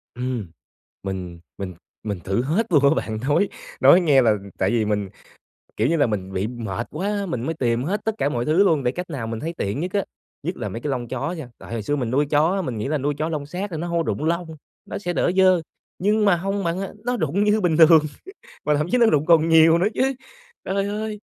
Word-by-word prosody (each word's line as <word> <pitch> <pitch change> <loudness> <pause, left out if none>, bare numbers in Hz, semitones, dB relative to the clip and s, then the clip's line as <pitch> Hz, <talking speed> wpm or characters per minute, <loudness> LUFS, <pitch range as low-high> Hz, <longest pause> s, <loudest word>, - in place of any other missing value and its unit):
Ừm, 125 -4 -3 0.6
mình 90 -3 -5 0.2
mình 95 -2 -5 0.3
mình 105 -3 -3
thử 95 +5 0
hết 165 - 0
luôn 145 -3 +5
á 140 - +7
bạn, 110 -1 -2
nói 150 +7 +3 0.3
nói 180 - +7
nghe 145 -6 +4
là 110 -3 +4 0.2
tại 95 - +1
vì 115 -2 +1
mình, 105 -2 -1 0.7
kiểu 110 - +1
như 165 +3 +2
là, 145 - +3
mình 95 -4 -3
bị 95 +2 -1
mệt 115 -2 -5
quá, 200 +5 -2
mình 130 -10 -3
mới 160 - -1
tìm 120 -5 0
hết 195 +8 -2
tất 220 -1 0
cả 145 - +1
mọi 120 -4 -2
thứ 160 +8 +4
luôn 160 -8 +2
để 125 - +1
cách 180 +5 -6
nào 130 -8 -4
mình 115 0 -4
thấy 165 +5 -4
tiện 100 +7 -2
nhất 180 +3 -3
á. 200 -1 +1 0.4
Nhất 175 +5 -3
là 110 -4 -4
mấy 115 +5 -6
cái 150 - -3
lông 125 -3 -2
chó 130 +7 -3
nha, 155 -8 -7
tại - - -12
hồi 115 -2 -3
xưa 145 - 0
mình 125 -5 -2
nuôi 145 +3 +2
chó 150 +3 +2
á, 195 - 0
mình 130 -10 -4
nghĩ 105 - -3
là 155 +2 0
nuôi 145 +1 -1
chó 155 +2 -1
lông 150 -3 -3
sát 185 +7 -5
nên 160 - -4
nó 170 - -3
hông 170 -1 0
rụng 150 - -2
lông, 165 0 -1 0.3
nó - - -5
sẽ 180 -3 -3
đỡ 175 - +1
dơ, 185 -2 +5 0.4
nhưng 210 +3 +2
mà 200 -3 +5
hông 195 +3 -2
bạn 170 +1 -1
ơi, 195 - -3 0.2
nó 245 0 0
rụng 170 +3 0
như 210 +1 +2
bình 170 -4 +2
thường 160 -2 +7 0.6
mà 150 - +3
thậm 150 +2 -1
chí - - +3
nó 240 - +5
rụng 150 -9 +3
còn 165 -1 +4
nhiều 160 0 +6
nữa 180 +4 +2
chứ. 270 +1 +1 0.5
Trời 195 +1 -1
ơi! 210 +1 -4
155 Hz, 255 wpm, -23 LUFS, 120-180 Hz, 0.7 s, á